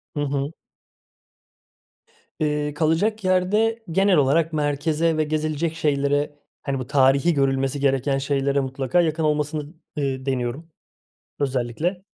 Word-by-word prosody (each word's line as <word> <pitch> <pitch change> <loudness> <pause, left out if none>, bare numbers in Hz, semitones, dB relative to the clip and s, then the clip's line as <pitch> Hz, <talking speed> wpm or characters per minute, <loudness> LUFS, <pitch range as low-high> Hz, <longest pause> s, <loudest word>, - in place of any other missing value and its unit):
Hı 145 - -2
hı. 140 0 -2 1.9
Eee, 150 -1 0
kalacak 170 +8 +1
yerde 210 +5 +1
genel 195 0 +3
olarak 155 +4 +2
merkeze 155 +2 0
ve 155 - +2
gezilecek 155 +1 -1
şeylere, 145 -1 0 0.2
hani, 135 -1 -2
bu 130 - -5
tarihî 140 +4 +4
görülmesi 135 0 0
gereken 135 0 +1
şeylere 140 0 0
mutlaka 135 +4 0
yakın 160 -1 0
olmasını, 150 +1 -1 0.2
eee, 135 -3 -2
deniyorum, 135 +5 -3 0.7
özellikle. 140 +7 -1
150 Hz, 115 wpm, -23 LUFS, 135-160 Hz, 1.9 s, tarihî